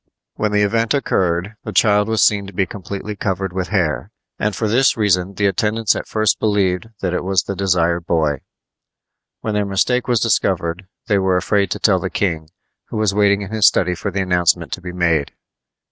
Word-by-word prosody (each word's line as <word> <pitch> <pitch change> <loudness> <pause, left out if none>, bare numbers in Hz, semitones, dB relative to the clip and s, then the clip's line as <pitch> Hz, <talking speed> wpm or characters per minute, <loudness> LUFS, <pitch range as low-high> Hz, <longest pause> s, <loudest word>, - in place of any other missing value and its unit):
When 105 -1 -1
the 105 0 +2
event 115 +4 +1
occurred, 95 -5 -1
the - - -5
child 105 -1 +3
was 110 -2 +2
seen 100 -2 +2
to 100 - -10
be 95 +1 +1
completely 100 +3 -7
covered 95 -2 -3
with 95 -1 -2
hair, 85 -8 -1 0.3
and 105 -1 -1
for 110 - -1
this 125 +4 +3
reason 100 -3 +1
the 100 - 0
attendants 105 +3 +1
at - - -5
first 110 -2 +1
believed 100 -2 0
that 90 -2 -1
it 90 - -1
was 95 +1 +1
the 100 - -5
desired 85 -3 0
boy. 75 -4 +1 1.0
When 110 - -3
their 105 0 +1
mistake 110 +6 0
was 120 -2 +2
discovered 95 -5 0 0.2
they 105 -4 +2
were 95 -1 +2
afraid 100 +1 +1
to - - -3
tell - - +3
the - - -3
king, 80 -5 -2 0.4
who - - -6
was 110 -2 +1
waiting 100 0 +2
in 100 - -8
his 110 -1 +4
study 90 -1 +2
for 90 - -4
the 95 0 -2
announcement 90 -2 +1
to 95 - -5
be 90 0 -6
made. 85 -5 0
100 Hz, 200 wpm, -19 LUFS, 90-105 Hz, 1.0 s, his